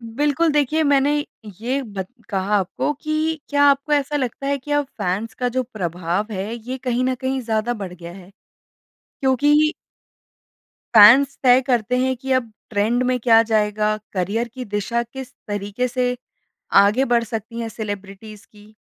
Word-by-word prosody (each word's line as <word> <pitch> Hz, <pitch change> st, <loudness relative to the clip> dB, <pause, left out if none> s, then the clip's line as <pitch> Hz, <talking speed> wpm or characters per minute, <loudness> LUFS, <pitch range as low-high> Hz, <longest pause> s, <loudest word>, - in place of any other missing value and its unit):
बिल्कुल। 295 Hz, +4 st, +2 dB
देखिए 295 Hz, +2 st, +1 dB
मैंने 285 Hz, 0 st, +3 dB, 0.5 s
ये 260 Hz, +4 st, -1 dB
बत 200 Hz, -5 st, -6 dB, 0.2 s
कहा 200 Hz, 0 st, 0 dB
आपको 195 Hz, +8 st, -1 dB
कि 310 Hz, +2 st, -2 dB
क्या 285 Hz, 0 st, +3 dB
आपको 280 Hz, +1 st, +2 dB
ऐसा 290 Hz, 0 st, 0 dB
लगता 275 Hz, 0 st, -3 dB
है 280 Hz, 0 st, +1 dB
कि 280 Hz, +2 st, -9 dB
अब 290 Hz, 0 st, +2 dB
फैन्स 195 Hz, +5 st, -2 dB
का 250 Hz, -1 st, -2 dB
जो 255 Hz, +1 st, -1 dB
प्रभाव 185 Hz, -2 st, -3 dB
है 200 Hz, +2 st, -4 dB
ये 245 Hz, +3 st, -6 dB
कहीं 250 Hz, -1 st, -1 dB
ना 255 Hz, 0 st, 0 dB
कहीं 265 Hz, +1 st, -2 dB
ज़्यादा 225 Hz, 0 st, -1 dB
बढ़ 195 Hz, -6 st, -7 dB
गया 170 Hz, -1 st, -10 dB
है? 185 Hz, -1 st, -13 dB, 0.9 s
क्योंकि 295 Hz, +3 st, +3 dB, 1.2 s
फैन्स 255 Hz, +6 st, +8 dB
तय 255 Hz, 0 st, +6 dB
करते 250 Hz, -1 st, +1 dB
हैं 260 Hz, +1 st, +1 dB
कि 265 Hz, +2 st, -5 dB
अब 255 Hz, -3 st, +1 dB, 0.2 s
ट्रेंड 225 Hz, +4 st, +1 dB
में 255 Hz, 0 st, 0 dB
क्या 225 Hz, -1 st, +5 dB
जाएगा, 215 Hz, -1 st, +1 dB, 0.2 s
करिअर 205 Hz, +5 st, -1 dB
की 250 Hz, +2 st, -8 dB
दिशा 210 Hz, +3 st, -2 dB
किस 260 Hz, +2 st, -10 dB
तरीके 205 Hz, +4 st, -2 dB
से 250 Hz, 0 st, -1 dB, 0.7 s
आगे 210 Hz, +7 st, +3 dB
बढ़ 235 Hz, -2 st, +2 dB
सकती 230 Hz, +1 st, -6 dB
है 230 Hz, -, -3 dB
सेलेब्रिटीज़ 205 Hz, -1 st, -8 dB
की। 210 Hz, 0 st, -19 dB
240 Hz, 160 wpm, -21 LUFS, 210-265 Hz, 1.2 s, फैन्स